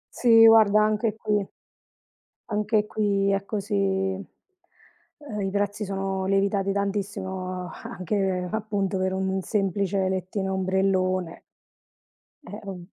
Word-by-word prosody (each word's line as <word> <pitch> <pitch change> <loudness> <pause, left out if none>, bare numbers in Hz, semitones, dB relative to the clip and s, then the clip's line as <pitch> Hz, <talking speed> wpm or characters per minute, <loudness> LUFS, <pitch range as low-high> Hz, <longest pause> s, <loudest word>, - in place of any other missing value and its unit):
Sì, 225 -2 +6
guarda, 215 -2 +6
anche 215 0 0
qui 210 -2 0 1.0
anche 210 0 0
qui 200 -2 +1
è 195 0 0
così. 205 0 -3
Ehm, 200 - -5
i 195 - -1
prezzi 205 +1 -1
sono 195 -1 -2
lievitati 195 0 +1
tantissimo, 190 -2 -3
anche 185 -1 -2
appunto 205 -3 -2
per 185 0 0
un 190 0 -1
semplice 195 -2 0
lettino 190 +1 -2
e - - -2
ombrellone. 185 -2 0 1.1
Eh, 205 - -7
ovv 180 -3 -7
195 Hz, 110 wpm, -25 LUFS, 190-210 Hz, 1.1 s, Sì